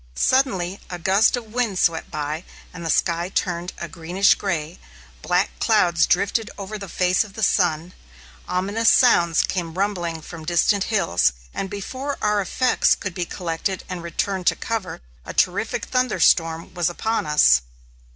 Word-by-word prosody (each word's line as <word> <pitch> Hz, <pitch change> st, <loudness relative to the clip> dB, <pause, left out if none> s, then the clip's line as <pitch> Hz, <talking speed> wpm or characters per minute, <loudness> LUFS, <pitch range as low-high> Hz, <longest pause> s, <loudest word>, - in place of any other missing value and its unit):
Suddenly 200 Hz, -9 st, +1 dB
a 180 Hz, -, -5 dB
gust 195 Hz, +7 st, +3 dB
of 225 Hz, -3 st, -9 dB
wind 235 Hz, -6 st, -1 dB
swept 165 Hz, -2 st, +1 dB
by; 150 Hz, +2 st, -4 dB, 0.3 s
the 170 Hz, -2 st, -6 dB
sky 170 Hz, +2 st, +1 dB
turned 175 Hz, -2 st, -2 dB
a -, -, -5 dB
greenish 180 Hz, +3 st, +2 dB
gray; 170 Hz, -4 st, -3 dB, 0.4 s
black 180 Hz, +2 st, +1 dB
clouds 175 Hz, -7 st, +3 dB
drifted 205 Hz, +4 st, +1 dB
over 205 Hz, +1 st, -6 dB
the 195 Hz, -2 st, -8 dB
face 180 Hz, +3 st, +2 dB
of 210 Hz, -3 st, -13 dB
the 220 Hz, -, -5 dB
sun; 175 Hz, -3 st, +1 dB, 0.5 s
ominous 200 Hz, +5 st, +1 dB
sounds 175 Hz, -10 st, +4 dB
came 170 Hz, -3 st, -3 dB
rumbling 175 Hz, -5 st, -2 dB
from 165 Hz, 0 st, -9 dB
distant 175 Hz, +4 st, +2 dB
hills, 85 Hz, -, +1 dB, 0.2 s
and 195 Hz, -, -4 dB
before 260 Hz, +8 st, -5 dB
our 210 Hz, -1 st, +1 dB
effects 250 Hz, +6 st, +2 dB
could 185 Hz, -3 st, -6 dB
be 175 Hz, 0 st, -3 dB
collected 180 Hz, +2 st, -3 dB
and 180 Hz, -2 st, -5 dB
returned 180 Hz, +2 st, -3 dB
to -, -, +4 dB
cover, 220 Hz, -, -4 dB, 0.2 s
a -, -, -8 dB
terrific -, -, 0 dB
thunderstorm 165 Hz, -11 st, +1 dB
was 175 Hz, -2 st, 0 dB
upon 220 Hz, +2 st, -2 dB
us. 65 Hz, -, +5 dB
185 Hz, 150 wpm, -22 LUFS, 170-205 Hz, 0.5 s, us